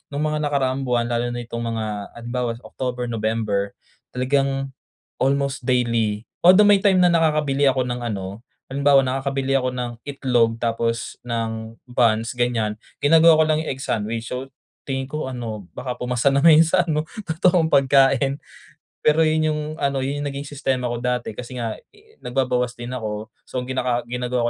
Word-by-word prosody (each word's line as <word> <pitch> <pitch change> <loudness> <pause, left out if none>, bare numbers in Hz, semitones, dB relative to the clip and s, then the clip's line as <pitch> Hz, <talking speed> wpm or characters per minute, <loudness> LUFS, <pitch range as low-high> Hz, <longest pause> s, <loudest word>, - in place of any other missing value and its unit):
nung 145 +2 -1
mga 150 0 -1
nakaraang 135 -2 0
buwan 120 -2 0
lalo 120 +1 0
na 120 - -4
itong 115 0 -5
mga 110 - -2 0.3
halimbawa 120 0 -3
October, 125 -1 -4
November, 110 -3 -1 0.4
talagang 135 +1 0 0.5
almost 140 +1 +1
daily, 115 -4 +1 0.2
although 185 +4 +8
may 200 -1 +6
time 195 -2 +4
na - - +6
nakakabili 150 -4 +2
ako 130 -1 +1
ng 125 0 -3
ano, 100 -1 -5 0.3
halimbawa 140 0 +5
nakakabili 135 +1 -1
ako 130 -1 0
ng 125 -1 -3 0.2
itlog 125 -5 +1
tapos 115 0 -1
ng 115 -1 -4
buns 115 -2 +2
ganyan 115 -3 -1 0.2
ginagawa 160 +1 +6
ko - - +6
lang 155 0 +1
yung - - -6
egg 135 - -9
sandwich. 115 +1 -2
So 130 +1 -4 0.4
tingin 135 -1 -1
ko 150 -1 -4
ano 115 -7 -6
baka 125 -1 -4
pumasa 125 +1 +1
na 140 - +3
'yun 160 +1 +8
sa 180 +3 +2
ano 155 -1 0 0.2
totoong 165 0 +3
pagkain. 135 0 +4 0.7
Pero 150 +2 +4
'yun 155 0 +2
yung 150 - -3 0.2
ano 140 -1 0
'yun 140 +2 -2
yung 145 - -2
naging 140 +1 -6
sistema 135 -3 -2
ko 120 - -3
dati 125 -1 -1
kasi 125 +3 -8
nga, 115 -2 -2 0.2
eh, 435 +1 -23
nagbabawas 125 -1 0
din 120 0 -6
ako 110 -2 -5 0.2
so - - -8
gina 130 0 -1 0.3
ginagawa 125 0 -2
130 Hz, 165 wpm, -22 LUFS, 115-140 Hz, 0.7 s, although